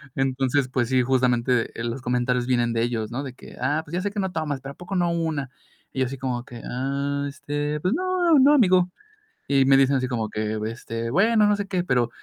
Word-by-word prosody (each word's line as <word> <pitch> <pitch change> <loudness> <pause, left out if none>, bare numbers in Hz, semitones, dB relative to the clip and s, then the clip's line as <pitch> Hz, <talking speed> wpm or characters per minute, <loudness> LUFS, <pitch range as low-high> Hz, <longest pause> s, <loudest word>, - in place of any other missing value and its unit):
Entonces, 135 0 +1
pues 125 -2 0
sí, 130 -1 +3
justamente, 125 -2 +1
eh, - - -3
los 120 +2 -3
comentarios 125 0 0
vienen 120 -2 +1
de 115 - 0
ellos, 115 -2 -2
¿no? 135 +4 -3
De 130 -2 -7
que: - - -13
"Ah, 145 +5 0
pues 150 - -13
ya 180 - 0
sé 205 +1 -2
que 205 - -4
no 190 -1 -1
tomas, 150 -4 -2
pero 140 0 -7
a - - -26
poco 180 +2 -6
no 175 -1 +2
una". 160 -5 -2 0.4
Y 130 - -5
yo 130 - +3
así 135 +1 -6
como 125 -2 -3
que: 120 -2 -10
"Ah, 140 +2 -2
este, 145 +1 -3
pues 185 +8 0
no, 360 -2 +2
no, 285 +3 +6
amigo". 185 -8 +4 0.6
Y 135 -1 +3
me 135 0 +6
dicen 135 0 +4
así 130 0 -1
como 115 -4 -2
que: 110 0 -2
"Este, 115 0 -5
bueno, 215 - +4
no 205 - +3
sé 200 -1 -4
qué", 185 -2 -1
pero, 125 -7 +1
135 Hz, 235 wpm, -24 LUFS, 125-170 Hz, 0.6 s, no